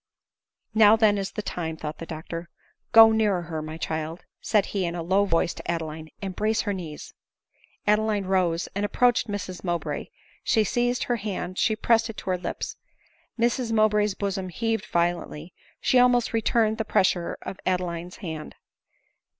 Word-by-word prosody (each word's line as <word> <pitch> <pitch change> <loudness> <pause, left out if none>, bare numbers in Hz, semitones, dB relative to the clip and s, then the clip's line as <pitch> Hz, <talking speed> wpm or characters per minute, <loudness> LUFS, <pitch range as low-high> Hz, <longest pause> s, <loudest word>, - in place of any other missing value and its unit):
" - - -66 0.3
Now 215 -1 +7
then 215 -2 +3
is 195 - -4
the 210 - -4
time," 160 -4 -4
thought 155 0 -6
the 165 - -7
doctor. 165 +1 -6 0.2
" - - -47
Go 225 -1 +9
nearer 210 -5 +2
her, 165 -2 -4
my 155 +1 -6
child," 160 +1 -4 0.2
said 210 -3 +2
he 195 -2 0
in 170 -1 -2
a 170 - -3
low 190 +4 +3
voice 165 -2 +1
to - - -9
Adeline, 160 -1 -5
" - - -37
embrace 215 +3 0
her 205 - -2
knees." 165 -6 -7 0.7
Adeline 210 -1 +2
rose, 180 -3 +1
and 200 - -2
approached 240 +3 +2
Mrs 195 -3 -5
Mowbray; 175 -2 -2 0.4
she 220 - +3
seized 245 +3 0
her 240 - 0
hand, 185 -3 -4
she 220 - +2
pressed 230 +1 +2
it 220 - -7
to 185 - -3
her 180 - +1
lips. - - -5 0.6
Mrs 235 0 +1
Mow 215 -1 +5
bray's 210 -1 +1
bosom 195 -2 -3
heaved 225 +2 -2
violently; 170 -1 -1 0.3
she 255 - +3
almost 245 -2 +4
returned 225 0 +2
the - - +1
pressure 185 -4 +1
of 190 - -6
Adeline's 180 -1 -2
hand. 160 -2 -6
195 Hz, 175 wpm, -26 LUFS, 170-220 Hz, 0.7 s, Go